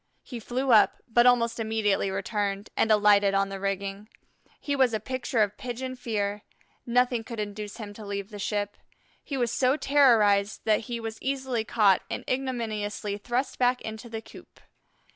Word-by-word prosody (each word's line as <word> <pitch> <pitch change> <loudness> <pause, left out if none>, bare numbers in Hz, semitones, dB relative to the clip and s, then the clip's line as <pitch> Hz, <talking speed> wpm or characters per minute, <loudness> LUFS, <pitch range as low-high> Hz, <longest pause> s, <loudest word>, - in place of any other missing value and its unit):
He 245 - -7
flew 255 +3 -1
up, 215 -3 +5
but 240 +1 +4
almost 235 -2 +3
immediately 220 -3 0
returned 200 +1 -3
and 225 - +2
alighted 205 -2 +5
on 195 0 +2
the 195 0 -6
rigging. 195 +1 -3 0.5
He 285 - -2
was 260 -4 +3
a - - -1
picture 250 0 0
of 205 0 -3
pigeon 255 +1 -5
fear; 210 -4 -2 0.5
nothing 245 -1 +2
could 230 -1 -7
induce 210 0 -5
him 210 -3 -7
to 215 - -10
leave 200 0 -5
the 205 - -8
ship. 205 0 -2 0.5
He 275 - -4
was 240 -2 0
so 260 +3 +2
terrorized 220 -9 +4
that 215 -1 +3
he 235 -1 -3
was 225 -1 -6
easily 265 -4 -1
caught 210 -4 +3
and - - -5
ignominiously 215 -6 -2
thrust 245 +5 -2
back 250 0 +3
into 220 +2 -7
the 225 0 -6
coop. - - -15
220 Hz, 170 wpm, -27 LUFS, 205-245 Hz, 0.5 s, up